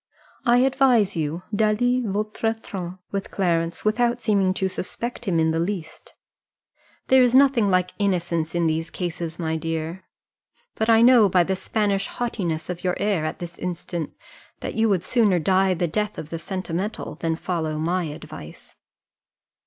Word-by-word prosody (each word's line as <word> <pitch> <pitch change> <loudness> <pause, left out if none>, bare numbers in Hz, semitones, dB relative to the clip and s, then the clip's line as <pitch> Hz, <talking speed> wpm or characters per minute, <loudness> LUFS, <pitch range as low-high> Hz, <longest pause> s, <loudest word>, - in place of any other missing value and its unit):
I 240 +1 +6
advise 255 -6 +3
you 160 +2 -2
d'aller 235 +4 +2
votre 215 +2 -1
train 185 -4 -6
with 200 0 -3
Clarence, 170 -2 -1
without 235 +3 +2
seeming 200 -5 +2
to 190 - 0
suspect 235 +6 -5
him 185 -5 +1
in 160 0 +3
the 165 - 0
least; 170 -2 -5 0.9
there 260 0 +7
is 250 0 +4
nothing 260 -6 +5
like 180 -1 +1
innocence 175 -5 0
in 170 -1 +2
these 160 +1 0
cases, 170 -2 -4
my 160 -2 -1
dear: 165 +3 -4 0.7
but 220 - -1
I 225 0 +6
know 240 -4 +7
by 180 -1 +4
the 190 +2 -1
Spanish 200 +1 0
haughtiness 175 -10 -3
of 180 -1 -5
your 180 -1 +1
air 200 -6 0
at 155 - -3
this 175 0 -8
instant, 175 -2 -4 0.5
that - - -4
you 225 0 +2
would 185 -4 +1
sooner 210 -4 +3
die 190 +3 +2
the 175 0 0
death 210 +5 -2
of 155 - -7
the 165 - -3
sentimental 185 +3 -4
than 165 -1 0
follow 160 -3 -2
my 170 +3 0
advice." 150 -1 -10
185 Hz, 160 wpm, -24 LUFS, 165-215 Hz, 0.9 s, there